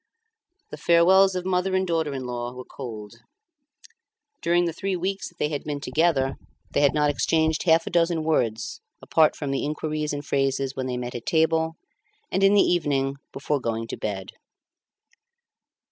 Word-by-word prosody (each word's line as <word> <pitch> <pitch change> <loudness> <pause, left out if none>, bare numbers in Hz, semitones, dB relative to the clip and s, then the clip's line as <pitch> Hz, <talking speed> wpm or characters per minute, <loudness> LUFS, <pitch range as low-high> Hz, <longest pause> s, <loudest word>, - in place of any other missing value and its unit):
The - - -6
farewells 185 +3 +5
of 180 0 -3
mother 185 0 0
and 190 0 +1
daughter 165 -4 0
in 130 -1 -5
law 120 0 -4
were 125 0 -8
cold. 110 -6 -8 1.3
During 175 +1 +2
the 170 - -2
three 190 +3 -2
weeks 195 +2 -3
that 175 - -26
they 150 - 0
had 145 -2 -4
been 145 -1 -4
together 135 -1 +1 0.3
they - - +1
had 145 0 +3
not 150 -1 +3
exchanged 160 +2 +1
half 165 0 +5
a - - -5
dozen 170 -1 +2
words 115 -8 -1 0.2
apart 160 -1 +3
from 145 -2 -4
the 135 - -1
inquiries 150 0 -2
and 145 0 -5
phrases 135 -1 0
when 130 -1 -3
they 125 -1 -2
met 125 0 -5
at 120 -1 -7
table 160 0 +2 0.6
and 190 - +1
in 195 +1 +6
the 200 - +6
evening 140 -5 0
before 140 0 -2
going 115 -1 -2
to - - -3
bed. 95 -3 -5
150 Hz, 175 wpm, -25 LUFS, 135-170 Hz, 1.3 s, in